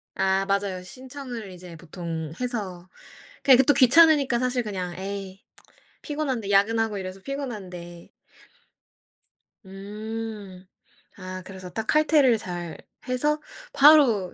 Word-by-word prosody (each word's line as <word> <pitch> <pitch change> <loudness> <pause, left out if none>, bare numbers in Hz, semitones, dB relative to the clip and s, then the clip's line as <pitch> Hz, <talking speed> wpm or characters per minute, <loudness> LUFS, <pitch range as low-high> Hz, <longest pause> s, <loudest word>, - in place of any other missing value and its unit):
아 190 0 +1
맞아요. 195 -2 -1
신청을 250 -1 -8
이제 180 -1 -11
보통 165 -2 -6
해서 190 -8 -4 0.5
그냥 260 -3 +7
그것도 270 +2 +5
귀찮으니까 280 -2 +5
사실 250 -1 0
그냥 185 -4 -4
'에이 195 0 -6 0.6
피곤한데. 270 -9 -3
야근하고 215 +1 +2
이래서 190 0 -7
피곤한데' 190 -11 -7 1.6
음. 205 -1 -7 0.5
아 185 0 -7
그래서 185 -2 -9
딱 220 +4 -4
칼퇴를 300 -6 +4
잘 175 -4 -6 0.3
해서 300 +4 0 0.3
바로 275 - +5
205 Hz, 245 characters per minute, -25 LUFS, 185-255 Hz, 1.6 s, 그냥